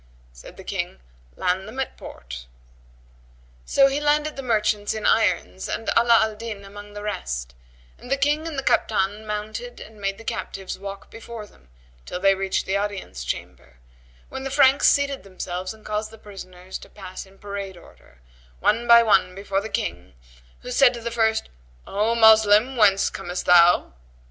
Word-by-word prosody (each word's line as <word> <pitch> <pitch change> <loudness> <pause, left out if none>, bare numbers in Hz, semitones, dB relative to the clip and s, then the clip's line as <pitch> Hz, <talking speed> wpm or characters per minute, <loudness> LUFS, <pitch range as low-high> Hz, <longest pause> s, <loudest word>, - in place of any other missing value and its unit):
Said - - -13
the - - -10
King, 65 - -4 0.4
"Land 185 +2 -1
them 240 +5 -8
at 265 - -3
the - - -23
port:" - - -9 1.2
so 275 - +5
he 275 +2 +1
landed 300 +1 +1
the 275 - -5
merchants 215 -4 0
in 215 - -4
irons 190 -3 +1
and 225 - -2
Ala 235 0 +6
al 220 0 -1
Din 210 -2 -7
among 205 +1 -11
the 205 0 -7
rest; 60 - -4 0.5
and - - -12
the 275 - +2
King 295 +3 +1
and 315 -3 -5
the 270 - -2
Kaptan 210 -1 +1
mounted 215 +3 -5
and 215 -1 -12
made 195 0 -1
the 225 - -12
captives 195 -4 -5
walk 195 0 -8
before 225 -1 -8
them 65 - -23 0.4
till 180 - -4
they 195 +1 +5
reached 195 0 -1
the 190 - -1
audience 200 - -3
chamber, - - -6 0.5
when 265 - -7
the 270 - -3
Franks 275 0 +5
seated 280 -1 +2
themselves 185 -1 -5
and 220 -1 -14
caused 215 0 -2
the 225 - -13
prisoners 185 -3 -10
to - - -14
pass 190 -1 -9
in 195 0 -20
parade 200 -2 -6
order, 60 - -19 0.4
one 235 +3 +1
by 235 0 +8
one 190 -4 +3
before 195 0 -2
the 220 - -6
King 85 - -4 0.5
who 250 - -6
said 250 -1 +5
to 235 - -7
the 235 +1 -4
first, 220 -1 +1 0.4
"O 215 +4 0
Moslem, 220 +2 +6
whence 200 -4 +4
comest 180 -2 -5
thou?" 175 - +5
210 Hz, 180 wpm, -23 LUFS, 190-230 Hz, 1.2 s, by